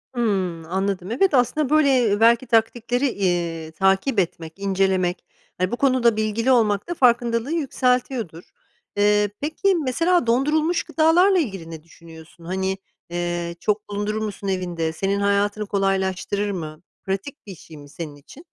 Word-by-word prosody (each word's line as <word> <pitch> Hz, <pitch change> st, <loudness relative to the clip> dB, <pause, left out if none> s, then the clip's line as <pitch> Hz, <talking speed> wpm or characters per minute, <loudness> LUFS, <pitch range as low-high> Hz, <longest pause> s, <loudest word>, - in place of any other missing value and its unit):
Hımm, 190 Hz, -8 st, -1 dB
anladım. 190 Hz, +2 st, -2 dB
Evet, 335 Hz, +9 st, +2 dB
aslında, 265 Hz, +3 st, +2 dB
böyle, 305 Hz, -1 st, +4 dB, 0.2 s
eee, 205 Hz, 0 st, +1 dB
belki 235 Hz, +2 st, +4 dB
taktikleri, 235 Hz, +3 st, +1 dB
iii, 170 Hz, -6 st, -2 dB
takip 195 Hz, -, +1 dB
etmek, 165 Hz, -3 st, -3 dB
incelemek, 190 Hz, -2 st, 0 dB, 0.3 s
hani, 185 Hz, +1 st, -1 dB
bu -, -, 0 dB
konuda 255 Hz, -4 st, +3 dB
bilgili 220 Hz, +3 st, 0 dB
olmak 215 Hz, -, +2 dB
da -, -, 0 dB
farkındalığı 240 Hz, -2 st, +2 dB
yükseltiyordur. 250 Hz, -, -1 dB, 0.5 s
Eee, 205 Hz, 0 st, +3 dB
peki, 370 Hz, +6 st, 0 dB
mesela 330 Hz, +3 st, +1 dB
dondurulmuş 305 Hz, +8 st, +1 dB
gıdalarla 350 Hz, +5 st, +3 dB
ilgili 195 Hz, -, -4 dB
ne 160 Hz, -1 st, -9 dB
düşünüyorsun? 165 Hz, 0 st, -15 dB
Hani, 190 Hz, +2 st, -2 dB, 0.3 s
eee, 175 Hz, 0 st, -3 dB
çok 210 Hz, +3 st, -1 dB
bulundurur 210 Hz, +1 st, -2 dB
musun 205 Hz, -2 st, -5 dB
evinde? 175 Hz, -4 st, -2 dB
Senin 195 Hz, +4 st, -1 dB
hayatını 200 Hz, +1 st, +1 dB
kolaylaştırır 195 Hz, +1 st, -1 dB
mı? 155 Hz, -4 st, -6 dB, 0.2 s
Pratik 195 Hz, +9 st, -5 dB
bir 195 Hz, -, -8 dB
şey 160 Hz, -1 st, -14 dB
mi 145 Hz, -1 st, -13 dB
senin 150 Hz, -1 st, -7 dB
için? 205 Hz, -, -15 dB
205 Hz, 140 wpm, -22 LUFS, 180-245 Hz, 0.5 s, böyle